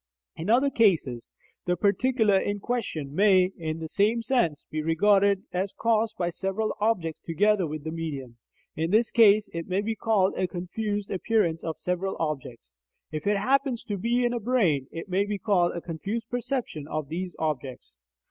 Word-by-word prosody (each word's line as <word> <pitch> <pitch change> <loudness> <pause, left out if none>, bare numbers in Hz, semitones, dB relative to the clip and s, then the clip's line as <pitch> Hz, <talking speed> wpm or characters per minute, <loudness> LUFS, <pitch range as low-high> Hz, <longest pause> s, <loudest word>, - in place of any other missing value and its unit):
In 165 +5 -5
other 260 +5 +4
cases, 160 - +2 0.4
the 180 - +2
particular 220 +2 +2
in 205 +1 -2
question 180 - -3
may, 190 0 +4
in 160 -1 -4
the 160 -1 -5
same 215 +7 +1
sense, 225 - 0
be 155 - -2
regarded 195 +4 +3
as 190 +2 -1
caused 225 -1 +1
by 175 -1 -1
several 195 +4 -2
objects 195 -7 0
together 195 +2 +1
with 155 -1 -6
the 160 - -4
medium; 140 -7 -5 0.4
in 160 +1 -1
this 220 +4 +3
case, 215 -2 +5
it 165 -1 -4
may 185 +2 0
be 220 +2 -2
called 210 -4 +2
a 185 - 0
confused 205 +3 -4
appearance 190 -4 0
of 160 -1 -4
several 180 +2 -2
objects. 135 - -4 0.4
If 155 +5 -4
it 205 0 +3
happens 260 +2 +1
to 205 -2 -3
be 240 +4 +1
in 240 - +1
a 240 - -1
brain, 195 - +1
it 165 +2 -7
may 190 +1 +1
be 205 0 -3
called 185 -3 +2
a 170 - -4
confused 200 +8 -5
perception 245 - -3
of 155 -2 -4
these 180 +3 -4
objects. 135 - -4
195 Hz, 175 wpm, -26 LUFS, 160-220 Hz, 0.4 s, case